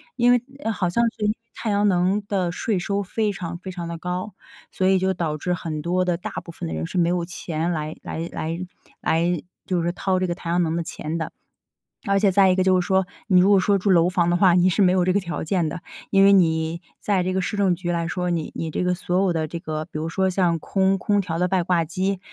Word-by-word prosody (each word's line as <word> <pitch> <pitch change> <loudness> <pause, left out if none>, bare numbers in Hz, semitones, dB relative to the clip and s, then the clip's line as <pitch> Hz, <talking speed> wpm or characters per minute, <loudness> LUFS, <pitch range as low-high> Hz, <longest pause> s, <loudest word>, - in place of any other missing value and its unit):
因 245 -1 +4
为 245 -1 +4 0.2
呃， 225 - 0
好 190 -4 -1
像 235 +7 +1
是 210 - -1
因 - - +3
为 - - -5 0.2
太 220 - -3
阳 205 0 +2
能 185 +3 +1
的 185 -4 0
税 205 0 -1
收 200 +3 -1
非 210 +2 -1
常 170 -3 -5
非 185 +2 -9
常 175 -2 -5
地 170 - -5
高， 180 +4 -4 0.4
所 185 - 0
以 190 - +4
就 190 +1 +1
导 165 -4 -2
致 180 +4 -2
很 160 -3 -4
多 180 +3 0
的 180 -1 +1
大 170 - -6
部 170 - -10
分 85 - -5
的 - - -4
人 80 +1 -3
是 - - -5
没 170 -1 +3
有 175 -1 0
钱 170 -2 -3
来 155 -1 -3
来 165 +1 -5
来 165 +2 -3 0.4
来 170 0 +1 0.2
就 180 -2 0
是 170 - 0
掏 185 0 0
这 185 - 0
个 175 - -2
太 170 -1 -7
阳 175 +1 +2
能 160 -1 -1
的 170 - -1
钱 160 0 -5
的。 160 - -4 0.8
而 200 0 +3
且 200 -1 +3
再 190 0 +5
一 185 - +3
个 185 - +2
就 185 -1 +4
是 - - -4
说， 190 -1 +2 0.2
你 185 -3 +5
如 195 - +4
果 200 - +6
说 200 +2 +3
住 200 - 0
楼 175 -1 +5
房 175 -1 +1
的 175 - +2
话， 185 -1 +5
你 180 +1 +4
是 185 - +1
没 185 -2 +5
有 180 -1 +2
这 185 - +2
个 200 - +3
条 175 -2 -4
件 170 0 0
的。 170 - -6 0.3
因 195 -1 +5
为 200 - +7
你 165 -2 +2 0.2
在 195 -3 +1
这 185 +1 -1
个 190 - +1
市 195 - -3
政 195 -3 +3
局 175 0 -3
来 170 -1 -1
说， 180 +1 -2
你 165 -3 -2
你 165 - -3
这 - - -1
个 180 0 +2
所 180 +1 0
有 195 -2 +2
的 160 -1 -1
这 170 +2 -6
个 155 -1 -4
比 - - -33
如 160 - -3
说 190 +2 +1
像 175 -3 +1
空 190 +3 +1
空 205 +2 +1
调 165 -3 -3
的 180 - +2
外 185 -2 +2
挂 170 -1 +2
机， 185 +4 -1
180 Hz, 295 characters per minute, -23 LUFS, 170-190 Hz, 0.8 s, 为